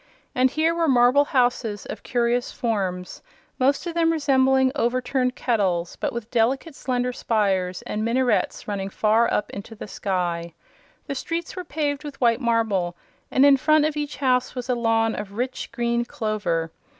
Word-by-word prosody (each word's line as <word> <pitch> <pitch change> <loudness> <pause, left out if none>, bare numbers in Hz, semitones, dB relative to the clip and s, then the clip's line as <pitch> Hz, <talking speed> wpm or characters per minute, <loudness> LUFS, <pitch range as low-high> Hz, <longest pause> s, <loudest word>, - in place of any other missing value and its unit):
And 255 +1 +3
here 320 +4 +1
were 335 -1 +1
marble 255 +2 +5
houses 245 -6 0
of - - -7
curious 240 0 0
forms, 190 -6 -3 0.4
most 275 +5 +2
of 340 - -3
them 330 -1 +2
resembling 265 -4 +3
overturned 255 0 0
kettles 190 -8 0
but - - -2
with 235 -1 -6
delicate 260 +7 +1
slender 250 -2 -2
spires 195 -7 0
and 215 - -3
minarets 245 +2 0
running 195 -2 -3
far 220 +3 +2
up 210 - -1
into 200 +3 -8
the 210 - -8
sky. 175 -4 -2 0.5
The - - -4
streets 330 +6 -4
were 365 - -5
paved 295 -2 -2
with 290 -2 -8
white 235 0 +3
marble 215 -7 0 0.3
and 265 - +4
in 280 -1 +7
front 305 +2 +3
of 310 -1 -1
each 295 -1 -4
house 255 -2 +1
was 250 0 -5
a - - +3
lawn 225 -1 +1
of 205 -1 -6
rich 250 +4 -4
green 235 0 0
clover. 205 -9 -2
245 Hz, 165 wpm, -24 LUFS, 210-270 Hz, 0.5 s, in